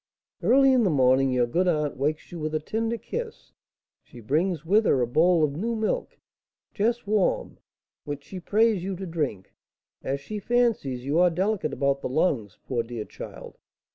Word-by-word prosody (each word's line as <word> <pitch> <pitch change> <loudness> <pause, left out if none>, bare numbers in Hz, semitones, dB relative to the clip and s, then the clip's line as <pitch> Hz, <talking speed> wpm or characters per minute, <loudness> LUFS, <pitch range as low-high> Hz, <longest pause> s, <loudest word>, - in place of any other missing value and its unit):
"Early 270 +1 +5
in 255 - +4
the 195 - +3
morning 130 -2 +3
your 125 -1 +2
good 175 +10 0
aunt 150 -4 0
wakes 150 +4 -2
you 175 - -7
with 155 0 -3
a - - +1
tender 225 +8 -2
kiss; 460 - -6 0.5
she 120 - -14
brings 155 - -1
with 210 +6 +3
her 135 - +3
a 125 - +2
bowl 160 +7 +3
of 150 - +2
new 230 +8 -2
milk, 220 - -2 0.6
just 235 +3 0
warm, 205 -2 0 0.4
which 145 -1 -6
she 170 +6 -8
prays 210 +1 +2
you 190 0 -3
to 190 +2 -6
drink, 150 - -3 0.5
as 140 +1 -2
she 210 +10 -6
fancies 210 - 0
you 145 +4 +1
are 180 0 +6
delicate 185 -1 -1
about 140 0 0
the - - -3
lungs, 130 - 0
poor 120 -3 -1
dear 115 -2 -6
child! - - -10
165 Hz, 180 wpm, -26 LUFS, 140-210 Hz, 0.6 s, are